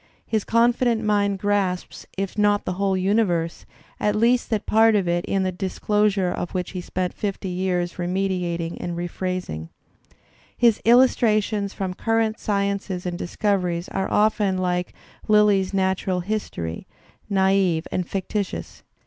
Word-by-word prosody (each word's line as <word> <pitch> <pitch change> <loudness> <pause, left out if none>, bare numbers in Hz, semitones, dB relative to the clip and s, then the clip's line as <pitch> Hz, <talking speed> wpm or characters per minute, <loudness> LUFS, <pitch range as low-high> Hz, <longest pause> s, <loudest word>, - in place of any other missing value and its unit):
His 220 -2 -1
confident 235 0 +2
mind 205 -2 +1
grasps, 195 -2 -1
if 195 -1 -3
not 205 -1 +2
the - - -1
whole 195 0 0
universe, 185 -4 0 0.3
at 210 0 +1
least 235 +3 +2
that 215 -2 -1
part 225 0 +4
of 195 -4 +1
it 175 0 +1
in 195 -1 0
the 185 - 0
disclosure 195 +1 0
of 175 +1 -4
which 180 -1 -2
he 185 - -5
spent 180 0 -3
fifty 200 -2 -4
years 180 -1 -2
remeditating 175 -2 -1
and 175 -1 -4
rephrasing. 175 - -4 0.9
His 235 -3 +3
illustrations 215 -4 +3
from 190 -2 -3
current 225 +2 0
sciences 200 -2 -2
and 175 -1 -2
discoveries 180 -1 -1
are 190 - -2
often 210 -2 +2
like 180 -1 -1 0.3
Lyly's 210 -3 +4
natural 190 -1 0
history, 175 - -4 0.4
naive 190 -4 +2
and 180 -1 -2
fictitious. 195 +1 -4
195 Hz, 135 wpm, -23 LUFS, 180-210 Hz, 0.9 s, part